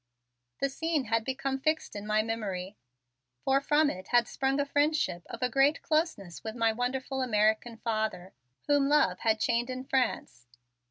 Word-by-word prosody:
The 275 Hz, -, +3 dB
scene 320 Hz, +1 st, -1 dB
had 230 Hz, -1 st, 0 dB
become 265 Hz, +2 st, -2 dB
fixed 310 Hz, -1 st, -1 dB
in 205 Hz, 0 st, -6 dB
my 215 Hz, 0 st, +2 dB
memory, 205 Hz, -4 st, -4 dB, 0.7 s
for 270 Hz, +1 st, +3 dB
from 295 Hz, +2 st, +3 dB
it 185 Hz, +1 st, -9 dB
had 240 Hz, -2 st, +3 dB
sprung 270 Hz, +1 st, -1 dB
a 285 Hz, -, +1 dB
friendship 290 Hz, -, +1 dB
of 235 Hz, -, -6 dB
a -, -, +4 dB
great 275 Hz, +5 st, +2 dB
closeness 310 Hz, -, -1 dB
with 220 Hz, 0 st, -5 dB
my 230 Hz, -1 st, +2 dB
wonderful 260 Hz, +3 st, -2 dB
American 220 Hz, -1 st, +1 dB
father 215 Hz, -5 st, -2 dB, 0.3 s
whom 285 Hz, -1 st, +3 dB
love 290 Hz, -12 st, +3 dB
had 220 Hz, -1 st, +1 dB
chained 240 Hz, +2 st, +1 dB
in 255 Hz, 0 st, -4 dB
France. 260 Hz, -, -1 dB
245 Hz, 165 wpm, -29 LUFS, 220-275 Hz, 0.7 s, a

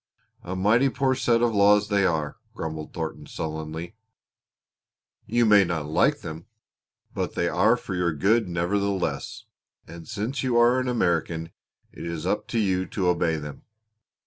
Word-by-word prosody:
"A 90 Hz, +2 st, -5 dB
mighty 110 Hz, +8 st, +3 dB
poor 135 Hz, 0 st, +1 dB
set 120 Hz, -2 st, +2 dB
of 120 Hz, -1 st, +2 dB
laws 105 Hz, 0 st, +4 dB
they 100 Hz, -2 st, +3 dB
are," 75 Hz, -3 st, -2 dB, 0.2 s
grumbled 80 Hz, -1 st, -5 dB
Thornton 80 Hz, -2 st, -5 dB
sullenly. 80 Hz, +3 st, -5 dB, 1.3 s
"You 120 Hz, +2 st, +2 dB
may 105 Hz, -2 st, +6 dB
not 85 Hz, -4 st, -2 dB
like 75 Hz, -, +2 dB
them, 80 Hz, +2 st, -8 dB, 0.7 s
but -, -, -3 dB
they -, -, +1 dB
are -, -, +3 dB
for -, -, -7 dB
your 90 Hz, -1 st, +1 dB
good 100 Hz, +7 st, +2 dB
nevertheless, 90 Hz, -3 st, -2 dB, 0.4 s
and 85 Hz, 0 st, -11 dB
since 110 Hz, +5 st, -3 dB
you 125 Hz, -3 st, +1 dB
are 120 Hz, +2 st, +5 dB
an 130 Hz, -, -2 dB
American 85 Hz, -7 st, 0 dB, 0.4 s
it -, -, -10 dB
is 85 Hz, -2 st, -4 dB
up -, -, -1 dB
to -, -, -3 dB
you 95 Hz, -4 st, +1 dB
to 95 Hz, -3 st, 0 dB
obey 85 Hz, -2 st, +1 dB
them. 75 Hz, -2 st, -7 dB
95 Hz, 155 wpm, -25 LUFS, 80-110 Hz, 1.3 s, may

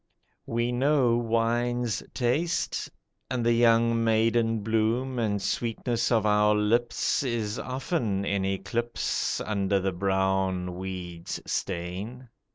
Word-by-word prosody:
We 120 Hz, +1 st, 0 dB
know 130 Hz, -1 st, +3 dB
wine's 120 Hz, 0 st, 0 dB
taste; 145 Hz, +8 st, -1 dB, 0.4 s
And 125 Hz, -2 st, -1 dB
the 120 Hz, -, +4 dB
young 115 Hz, 0 st, +4 dB
maiden 115 Hz, 0 st, +2 dB
bloom 115 Hz, +4 st, 0 dB
and 105 Hz, -3 st, 0 dB
sweetness 115 Hz, +3 st, -1 dB
of 110 Hz, -3 st, +3 dB
our 105 Hz, 0 st, +4 dB
lips 115 Hz, +3 st, +1 dB
Is 115 Hz, -5 st, -2 dB
often 125 Hz, -, -2 dB
in 100 Hz, -1 st, 0 dB
eclipse 95 Hz, +5 st, -1 dB
Under 100 Hz, -2 st, 0 dB
the 95 Hz, 0 st, -1 dB
brown 95 Hz, -1 st, 0 dB
weed's 90 Hz, -2 st, -5 dB
stain. 100 Hz, +8 st, -4 dB
115 Hz, 110 wpm, -27 LUFS, 100-120 Hz, 0.4 s, the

